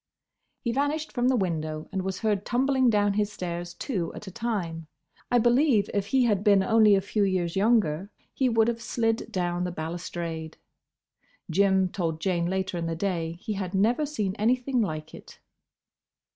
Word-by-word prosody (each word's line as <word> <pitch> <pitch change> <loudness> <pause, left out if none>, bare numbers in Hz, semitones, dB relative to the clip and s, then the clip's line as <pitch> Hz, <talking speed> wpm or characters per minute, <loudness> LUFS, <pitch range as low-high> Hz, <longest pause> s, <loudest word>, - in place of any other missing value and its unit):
He 235 - -1
vanished 290 +4 -1
from 245 -1 0
the 260 - +3
window 155 -6 -2
and 195 -1 -2
was 190 0 -4
heard 210 -3 +1
tumbling 260 +1 +2
down 205 -2 +2
his 210 0 0
stairs 175 -2 -5
two 190 -12 -3
at - - -8
a 190 - -8
time. 180 -8 -3 0.4
I 245 - +4
believe 240 -1 +3
if 200 -1 -1
he 260 +3 +3
had 205 -5 +1
been 200 -3 +5
only 215 -1 +5
a 195 - +2
few 205 +2 0
years 185 -3 0
younger 195 -4 +2 0.2
he 260 -2 +1
would 225 -1 +3
have 235 -1 -1
slid 225 -1 -1
down 175 -1 -1
the 180 - -2
balustrade. 165 -1 -5 0.9
Jim 190 +1 +3
told 165 -4 -2
Jane 170 -1 0
later 190 -1 -2
in 165 - -2
the 165 - -2
day 165 -2 -2
he 200 +6 -5
had 195 -1 -4
never 235 +10 +2
seen 210 -10 -2
anything 250 +3 +1
like 155 -6 -4
it. - - -13
200 Hz, 175 wpm, -27 LUFS, 175-230 Hz, 0.9 s, been